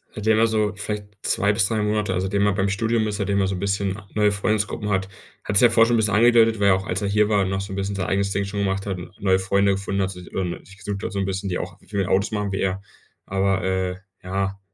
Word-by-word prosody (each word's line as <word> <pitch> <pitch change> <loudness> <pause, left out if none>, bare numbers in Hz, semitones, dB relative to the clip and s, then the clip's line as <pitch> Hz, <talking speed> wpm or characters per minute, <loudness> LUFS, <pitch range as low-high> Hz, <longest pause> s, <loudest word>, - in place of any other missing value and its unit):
Seitdem 110 0 +2
er 115 - +5
so 105 -2 0
vielleicht 105 0 -4 0.2
2 100 +1 +2
bis 95 -1 +2
3 110 -2 -1
Monate 105 -2 0
also, 90 +1 -1
seitdem 100 +1 +1
er 105 - +3
beim 100 0 0
Studium 110 +2 0
ist, 105 -1 -3
seitdem 100 -1 0
er 95 - +2
so 95 - -2
'n - - -5
bisschen 100 0 -1
neue 105 -1 +3
Freundesgruppen 105 0 -1
hat, 95 -1 0 0.3
hat 100 - +1
sich - - +5
ja - - -3
vorher 115 0 +5
schon 120 - +2
'n - - +3
bisschen 110 -2 +1
angedeutet, 115 0 +5
weil 100 - +3
er 95 - +6
auch 95 +1 -4
als 95 +1 -2
er 100 - -1
hier 105 +1 +2
war, 100 -2 +3
noch 95 0 -1
so 95 0 -6
'n - - -4
bisschen 100 +1 -2
sein 95 -2 -2
eigenes 100 +1 0
Ding 100 0 0
schon 100 +1 -4
gemacht 95 0 -1
hat, 95 -3 -3
n 90 - -9
neue 95 -1 +3
Freunde 100 +1 +2
gefunden 100 0 -2
hat, 95 - -2
sich, 90 -1 -11
ähm, 90 -2 -2 0.2
gesucht 100 0 -5
hat - - -3
so 100 - -2
'n 95 - 0
bisschen, 95 +1 -3
die 90 - -1
auch, - - -7
w - - -23
viel 100 +1 -3
mit 95 - 0
Autos 100 +3 +2
machen, 105 -2 -2
wie 95 - -2
er. 95 0 -1 0.4
Aber, 95 0 0
äh, 95 -1 -1 0.3
ja, 95 +1 -2
100 Hz, 290 wpm, -23 LUFS, 95-105 Hz, 0.4 s, er